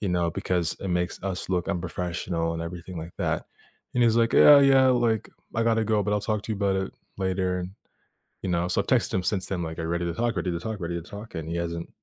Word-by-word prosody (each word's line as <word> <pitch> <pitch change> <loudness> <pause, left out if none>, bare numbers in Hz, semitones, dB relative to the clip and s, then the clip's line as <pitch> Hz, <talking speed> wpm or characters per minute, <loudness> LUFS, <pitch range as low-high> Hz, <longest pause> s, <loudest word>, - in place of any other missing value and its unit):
you 100 - -1
know, 85 -1 +1
because 85 0 -1
it 100 - -4
makes 90 0 -1
us 95 -2 -3
look 90 -1 0
unprofessional," 85 -2 -2
and 85 0 -3
everything 85 +1 -7
like 85 +2 -8
that, - - -1 0.5
and 125 - +3
he's, 115 -1 +4
like, 115 0 +3
"Yeah, 145 -1 +9
yeah, 135 -1 +6
like, 120 -4 +2 0.3
I 115 - +1
gotta 115 -1 +2
go, 110 -1 +2
but 105 - -1
I'll 105 - +1
talk 105 -1 -1
to 110 - -3
you - - -3
about 100 -1 +1
it 95 0 -2 0.2
later," 95 -1 0
and 90 +1 -5 0.7
you 95 - -2
know, 85 0 +1
so, - - +1
I've - - -16
texted - - +2
him 95 - +1
since 95 0 0
then, 90 -3 -2
like, 80 0 -5
"Are 80 - -2
you 80 - -3
ready 85 +1 -1
to 85 - -1
talk? 120 +3 0
Ready 90 - -1
to 85 0 -3
talk? 110 +2 -4
Ready 85 -1 -3
to 85 - -14
talk?" 105 +1 -9
and 80 -1 -5
he 85 - -2
hasn't 85 0 -3
90 Hz, 265 wpm, -26 LUFS, 85-105 Hz, 0.7 s, Yeah